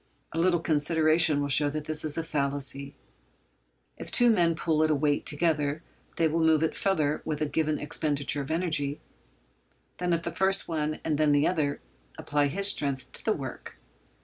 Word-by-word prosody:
A 165 - -3
little 175 0 +2
consideration 155 0 +2
will 145 - -1
show 145 +1 +3
that 150 +1 -5
this 155 0 -1
is 155 0 -3
a 165 - -1
fallacy. 140 -2 -2 1.0
If - - -7
two 240 -1 +5
men 170 -6 +2
pull 160 -1 0
at 155 - +2
a 155 - +2
weight 145 0 0
together 150 -1 0 0.3
they 165 - +2
will 160 +2 -1
move 160 -1 +3
it 160 - -1
farther 155 -7 0
with 150 -2 -3
a 155 - 0
given 155 0 -1
expenditure 145 -1 -1
of 135 - -7
energy 155 -4 -1 1.0
than 180 0 -1
if 170 0 0
first 190 +1 +1
one 155 -2 -2
and 155 -2 -1
then 150 -1 +3
the 145 +1 +3
other 150 -5 -1 0.4
apply 145 0 0
his 195 +7 0
strength 140 -8 0
to - - 0
the - - +1
work. - - -8
155 Hz, 180 wpm, -27 LUFS, 145-165 Hz, 1.0 s, two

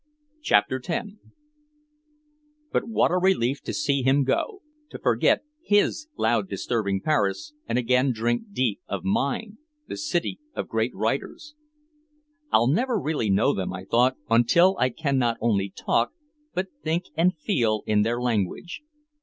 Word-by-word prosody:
CHAPTER 125 - +2
X 235 -2 -1 1.6
But - - 0
what 225 - +2
a 180 - +2
relief 140 -8 +1
to - - -5
see 140 -2 0
him 135 +2 +3
go, 395 - -1 0.3
to - - -8
forget - - +2 0.2
his 210 +5 +1
loud 190 - +1
disturbing 100 -5 -1
Paris 100 -6 0
and 115 - 0
again 125 +2 +2
drink 120 - -1
deep 125 - 0
of 100 -3 -4
mine, 200 - -1 0.3
the - - -5
city 180 - -2 0.2
of - - -3
great - - -1
writers. 300 0 -3 1.0
"I'll - - +4
never 230 - +1
really 150 - -1
know 100 +3 +3
them," 95 -1 -3
I 90 +1 -7
thought, 125 +5 +2
"until 120 +12 +4
I 130 - +3
can 140 +1 -1
not 120 -2 +1
only 100 -4 +1
talk 115 +4 0 0.4
but 185 +1 -1
think 165 +3 -1
and 170 +2 +2
feel 115 - 0
in 105 -1 +2
their 115 +3 0
language." 120 - -2
130 Hz, 145 wpm, -25 LUFS, 115-175 Hz, 1.6 s, I'll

